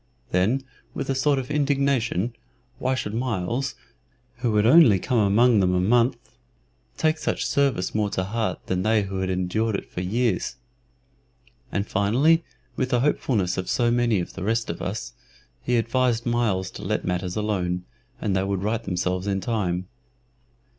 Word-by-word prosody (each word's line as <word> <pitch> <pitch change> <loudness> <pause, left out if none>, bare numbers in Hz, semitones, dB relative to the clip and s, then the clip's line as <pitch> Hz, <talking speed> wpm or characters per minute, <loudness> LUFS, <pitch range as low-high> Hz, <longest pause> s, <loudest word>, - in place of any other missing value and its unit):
Then, 110 +10 +2 0.3
with 135 - -2
a - - +2
sort 140 +2 +2
of 135 +2 -4
indignation, 140 -7 +1 0.5
why 130 +1 0
should 105 -5 -3
Myles, 120 +2 -2 0.6
who 120 -3 0
had 105 0 +3
only 125 - +7
come 120 +6 0
among 110 +3 +4
them 90 -1 +2
a - - +2
month, 120 +6 +3 0.8
take 155 0 +1
such - - -1
service 135 -10 +1
more 105 -1 +1
to 95 -2 -1
heart 105 -1 -2
than 90 0 -1
they 110 +1 +2
who 95 -1 -4
had 95 0 -1
endured 95 +4 0
it - - -5
for 90 - -4
years? 110 +3 0 1.2
And, 100 0 -1
finally, 130 - +3 0.3
with 130 - -1
the 120 -1 +2
hopefulness 105 -10 +1
of 95 - -4
so 120 -1 +2
many 120 -4 +2
of 85 - -5
the 95 - -8
rest 115 +1 0
of 85 - -8
us, 100 +5 -4 0.5
he 125 0 +1
advised 120 0 +1
Myles 110 -6 0
to - - -9
let - - -2
matters 90 0 -2
alone, 90 -4 -1 0.3
and 100 -3 -1
they 95 - +1
would 95 -1 -2
right 110 +2 -1
themselves 90 0 -2
in 100 -1 0
time. 95 -5 -2
110 Hz, 165 wpm, -24 LUFS, 95-125 Hz, 1.2 s, only